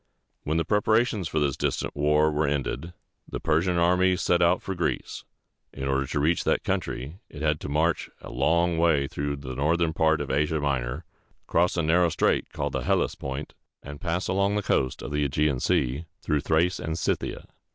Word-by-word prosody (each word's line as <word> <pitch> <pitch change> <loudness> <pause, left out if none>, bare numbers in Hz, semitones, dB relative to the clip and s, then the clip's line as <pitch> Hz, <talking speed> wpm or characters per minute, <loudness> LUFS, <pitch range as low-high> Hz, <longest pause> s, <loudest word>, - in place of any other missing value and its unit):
When 75 +2 -1
the 80 - +1
preparations 110 -1 +2
for 80 - -1
this 70 -3 +1
distant - - -2
war 75 +1 +3
were 75 0 +1
ended, 75 +4 -2 0.4
the - - -4
Persian 85 +3 +1
army 90 +2 +3
set 90 -1 +1
out 85 +1 +4
for 95 - -3
Greece. 80 -8 -3 0.5
In 70 0 -5
order 70 0 0
to 75 - -2
reach 80 +4 +2
that - - +1
country, 70 +9 -3
it 75 0 -8
had 75 -1 +1
to - - -6
march 80 +4 +1
a - - -10
long 85 +6 +2
way 80 -4 +3
through 70 +1 -3
the 70 -2 -7
northern 80 +4 +1
part 80 -1 +2
of - - -3
Asia 75 +3 +1
Minor, 70 +1 -2 0.4
cross 90 +1 +1
a 85 - +1
narrow 85 +2 +3
strait - - +1
called - - -3
the - - -1
Hel´les - - +1
pont, 70 +2 -6 0.3
and 70 0 -9
pass 85 +2 -1
along 100 +2 +1
the 105 - 0
coast 65 -7 0
of - - -6
the 75 -1 0
Ægean 70 -2 +1
Sea, 70 +7 0 0.2
through 75 -2 +1
Thrace 80 +4 +1
and 80 +1 -3
Scyth´i 80 - -1
a. - - -13
80 Hz, 195 wpm, -26 LUFS, 70-85 Hz, 0.5 s, out